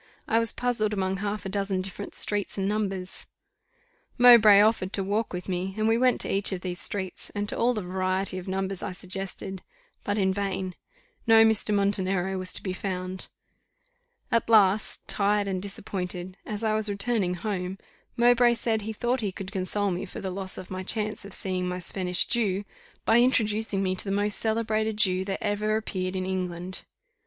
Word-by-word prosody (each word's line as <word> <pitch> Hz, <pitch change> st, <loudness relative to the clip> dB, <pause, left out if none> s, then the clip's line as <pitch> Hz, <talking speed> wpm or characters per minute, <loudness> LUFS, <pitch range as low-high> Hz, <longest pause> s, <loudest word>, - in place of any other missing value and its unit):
I 225 Hz, -, +3 dB
was 230 Hz, -1 st, +1 dB
puzzled 235 Hz, -4 st, -1 dB
among 190 Hz, -1 st, -1 dB
half 205 Hz, +1 st, -3 dB
a -, -, -2 dB
dozen 195 Hz, -1 st, -1 dB
different 195 Hz, +1 st, -4 dB
streets 205 Hz, -1 st, +4 dB
and 195 Hz, 0 st, 0 dB
numbers: 195 Hz, -3 st, -3 dB, 0.9 s
Mowbray 230 Hz, -5 st, +8 dB
offered 210 Hz, -3 st, +3 dB
to 195 Hz, -, +2 dB
walk 210 Hz, +3 st, -1 dB
with 180 Hz, 0 st, -5 dB
me, 190 Hz, +1 st, -3 dB
and 215 Hz, 0 st, +1 dB
we 225 Hz, -, +4 dB
went 250 Hz, +1 st, +3 dB
to -, -, -1 dB
each 195 Hz, +1 st, +2 dB
of 185 Hz, -2 st, -3 dB
these 180 Hz, -1 st, -4 dB
streets, 190 Hz, -3 st, -3 dB
and 205 Hz, 0 st, -2 dB
to -, -, -2 dB
all 245 Hz, +1 st, +2 dB
the 210 Hz, -, -3 dB
variety 185 Hz, +1 st, -1 dB
of 180 Hz, -, -10 dB
numbers 190 Hz, 0 st, -2 dB
I 190 Hz, -, -4 dB
suggested, 190 Hz, +1 st, -6 dB, 0.4 s
but 205 Hz, +1 st, -1 dB
in 190 Hz, -2 st, +2 dB
vain; 190 Hz, -2 st, -2 dB, 0.5 s
no 225 Hz, 0 st, +7 dB
Mr. 220 Hz, -1 st, +2 dB
Montenero 195 Hz, -2 st, +1 dB
was 185 Hz, 0 st, -4 dB
to -, -, 0 dB
be 185 Hz, -, -2 dB
found. 185 Hz, -1 st, -4 dB, 1.0 s
At 230 Hz, -1 st, +1 dB
last, 210 Hz, -2 st, +3 dB
tired 205 Hz, 0 st, +1 dB
and 185 Hz, -2 st, -2 dB
disappointed, 185 Hz, -2 st, -5 dB
as 210 Hz, +1 st, -4 dB
I 220 Hz, -1 st, +2 dB
was 215 Hz, -1 st, 0 dB
returning 200 Hz, -2 st, 0 dB
home, 185 Hz, -1 st, -3 dB, 0.4 s
Mowbray 240 Hz, 0 st, +5 dB
said 225 Hz, -1 st, 0 dB
he 220 Hz, +2 st, -5 dB
thought 240 Hz, +3 st, -1 dB
he 205 Hz, -3 st, -1 dB
could 190 Hz, +1 st, -7 dB
console 200 Hz, +1 st, 0 dB
me 175 Hz, +2 st, -3 dB
for 180 Hz, -, -8 dB
the 190 Hz, -, -4 dB
loss 190 Hz, 0 st, -4 dB
of 185 Hz, -, -9 dB
my 185 Hz, 0 st, -4 dB
chance 210 Hz, +1 st, -2 dB
of 200 Hz, -, -9 dB
seeing 185 Hz, -1 st, -1 dB
my 180 Hz, 0 st, -2 dB
Spanish 180 Hz, 0 st, 0 dB
Jew, 205 Hz, -4 st, 0 dB, 0.4 s
by 225 Hz, +1 st, +5 dB
introducing 220 Hz, -5 st, +2 dB
me 185 Hz, -1 st, 0 dB
to -, -, +2 dB
the -, -, -4 dB
most 205 Hz, +1 st, +1 dB
celebrated 220 Hz, -1 st, 0 dB
Jew 185 Hz, -3 st, +3 dB
that 195 Hz, -1 st, -4 dB
ever 210 Hz, +1 st, 0 dB
appeared 185 Hz, -4 st, -3 dB
in 185 Hz, 0 st, -2 dB
England. 185 Hz, -1 st, -3 dB
195 Hz, 190 wpm, -27 LUFS, 185-215 Hz, 1.0 s, Mowbray